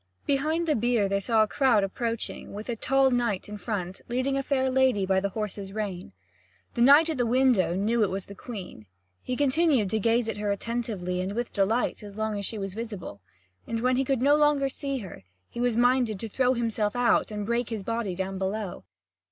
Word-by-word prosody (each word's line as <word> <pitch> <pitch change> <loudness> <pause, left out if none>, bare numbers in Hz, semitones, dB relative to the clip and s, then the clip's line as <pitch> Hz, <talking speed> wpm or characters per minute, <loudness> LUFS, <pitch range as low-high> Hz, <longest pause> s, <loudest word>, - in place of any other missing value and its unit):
Behind 310 +5 0
the 310 - +3
bier 235 -4 +1
they 200 0 0
saw 220 +2 +3
a - - -1
crowd 245 -4 +3
approaching, 230 +3 -3
with 210 +4 -7
a 240 - -1
tall 270 +3 +3
knight 235 -6 0
in 210 0 -7
front, 190 -5 -4
leading 255 +3 0
a 275 - +1
fair 265 -1 0
lady 260 -6 +2
by 190 0 +2
the 200 +1 -1
horse's 200 -1 -5
rein. 195 - -4 0.6
The 235 - -2
knight 290 +6 +7
at 310 - -3
the 245 - +2
window 245 -8 +3
knew 215 +5 +1
that 215 - +5
it - - -3
was 190 0 -4
the 200 - -10
Queen. 190 - -9 0.3
He 255 - -3
continued 280 - +2
to 220 - +1
gaze 230 +2 +2
at 225 - -3
her 210 0 -2
attentively 200 -4 -2
and 190 +2 -3
with 240 +2 -3
delight 220 +6 0
as 205 -1 -10
long 220 -1 -1
as 200 - -2
she 225 - -3
was 195 -2 -4
visible. 205 - -7 0.5
And 230 -1 -2
when 255 +1 +2
he 265 - +2
could 265 -2 0
no 285 +2 +5
longer 295 -2 +3
see 275 0 -4
her, 185 - -10 0.3
he 235 - -5
was 245 -2 +1
minded 245 -4 +2
to 225 - -3
throw 255 +4 +1
himself 225 -2 -1
out 245 -1 +2
and 210 -1 -4
break 235 +1 -1
his 220 -4 -4
body 230 -4 -2
down 190 +1 -3
below. 195 0 -3
230 Hz, 215 wpm, -27 LUFS, 200-255 Hz, 0.6 s, knight